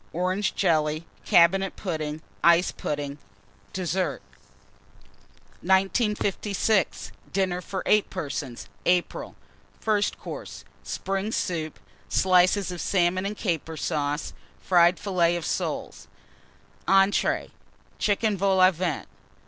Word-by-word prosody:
Orange 185 +4 0
Jelly. 155 -3 +1 0.2
Cabinet 190 +3 +4
Pudding. 155 -4 -4 0.2
Ice 170 +1 +5
Pudding. 145 -1 -4 0.5
DESSERT. 185 0 -2 1.4
1956. 200 +1 +1 0.2
DINNER 185 -2 0
FOR 190 +1 -5
8 210 -1 +3
PERSONS 140 -8 -5 0.2
(April). 180 -1 0 0.4
FIRST 210 -2 0
COURSE. - - -8 0.2
Spring 195 +2 -3
Soup. 160 -7 -2 0.3
Slices 185 +1 +3
of 175 - -5
Salmon 185 0 +1
and 210 +1 -5
Caper 165 -4 -2
Sauce. 145 -1 -2 0.3
Fried 175 -1 +4
Filleted 175 -4 +1
Soles. - - -3 0.8
ENTREES. 195 +1 +3 0.5
Chicken 210 +1 +1
Vol 195 0 +2
au 185 0 +7
Vent. 170 -3 -3
185 Hz, 95 wpm, -26 LUFS, 165-195 Hz, 1.4 s, au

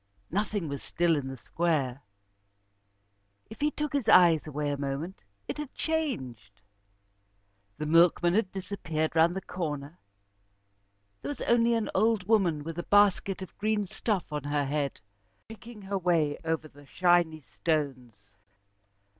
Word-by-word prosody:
Nothing 205 -1 -1
was 140 -2 -5
still 170 -1 +1
in 140 -3 -3
the 135 0 -6
square. 140 -3 -1 1.5
If 220 - -10
he 300 - +3
took 300 0 -4
his 265 -6 0
eyes 170 -4 +6
away 150 0 -2
a - - -1
moment 140 +6 -4 0.3
it - - -4
had 300 -3 -5
changed. 130 - -3 1.2
The 150 - -3
milkman 170 +2 +4
had 195 -2 +1
disappeared 175 -5 -3
round 165 +2 +4
the 190 - -3
corner, 155 -3 -5 1.2
there - - -5
was 290 - -5
only 235 0 +3
an 225 -2 -1
old 220 0 +2
woman 180 -9 +2
with 165 +2 -6
a - - -3
basket 200 -1 +3
of 185 - -12
green 210 0 0
stuff 190 -3 -2
on 150 -2 -3
her 145 0 0
head, 140 0 -2 0.5
picking 225 -1 -11
her 195 0 -2
way 165 -5 +1
over 160 -1 -2
the 145 -1 -18
shiny 175 -3 +2
stones. 130 - -3
170 Hz, 145 wpm, -29 LUFS, 145-205 Hz, 1.5 s, eyes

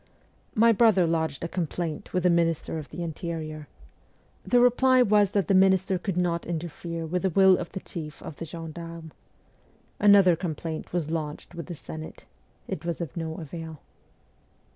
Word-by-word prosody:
My 230 +2 +6
brother 215 -5 +4
lodged 160 -3 -1
a - - -1
complaint 165 -2 -4
with 180 -1 0
the 180 - +4
Minister 165 -1 0
of 150 - -9
the 175 - -5
Interior. 155 -2 -5 0.8
The 245 - +3
reply 250 +1 +5
was 205 -2 +4
that 200 -1 0
the 195 - +3
minister 190 0 +4
could 180 0 -3
not 170 -2 0
interfere 165 0 -4
with 180 +3 -1
the 190 - +1
will 190 +1 +6
of 175 -1 -5
the 190 - -5
chief 155 -4 -7
of 150 - -8
the 165 - -5
gendarmes. 165 0 -8 0.9
Another 200 -4 +6
complaint 160 -2 -5
was 165 -3 -2
lodged 155 0 -4
with 170 -1 -7
the 175 - -6
Senate. 155 +1 -9 0.4
It 155 - -5
was 170 -1 -3
of 165 -7 -5
no 160 -1 -4
avail. 160 -1 -7
170 Hz, 165 wpm, -26 LUFS, 160-190 Hz, 0.9 s, My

